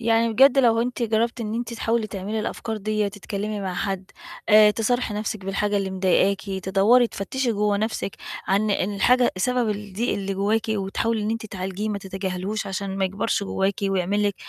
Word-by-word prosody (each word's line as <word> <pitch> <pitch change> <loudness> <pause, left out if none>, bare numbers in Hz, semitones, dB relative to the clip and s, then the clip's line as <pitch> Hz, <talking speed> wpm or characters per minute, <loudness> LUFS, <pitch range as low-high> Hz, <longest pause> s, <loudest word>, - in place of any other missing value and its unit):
يعني 230 0 +2
بجد 270 +3 +6
لو 230 -3 +4
أنتِ 250 0 -3
جرّبتِ 230 +2 0
إن 215 0 -3
أنتِ 235 0 -3
تحاولي 225 -1 0
تعملي 210 +1 -4
الأفكار 220 0 -4
ديّة 215 0 -1
تتكلمي 205 +1 -4
مع 185 -2 -3
حد، 195 -1 -3 0.4
آآ، 215 -1 +8
تصارحي 230 0 0
نفْسِك 210 -2 -4
بالحاجة 205 +1 0
اللي 195 -1 -1
مضايقاكِ 190 +1 +2 0.2
تدوّري 210 +6 +4
تفتشي 235 +4 -2
جوّه 205 -1 +1
نفْسِك 215 -2 -2 0.3
عن 205 +2 +2
إن 200 +1 0
الحاجة 245 +5 +3
سبب 245 +3 +1
الضيق 210 +3 -2
اللي 195 -1 -3
جواكِ 210 +3 +1
وتحاولي 215 +2 -1
إن 210 - -1
أنتِ 225 0 -3
تعالجيه 195 +1 -4
ما 205 -1 -2
تتجاهليهوش 190 +2 -4
عشان 195 0 -4
ما 195 - +2
يكبرش 200 +2 -1
جواكِ 195 0 0
ويعمل 195 +1 +1
لِك 200 - -4
210 Hz, 180 wpm, -24 LUFS, 195-225 Hz, 0.4 s, آآ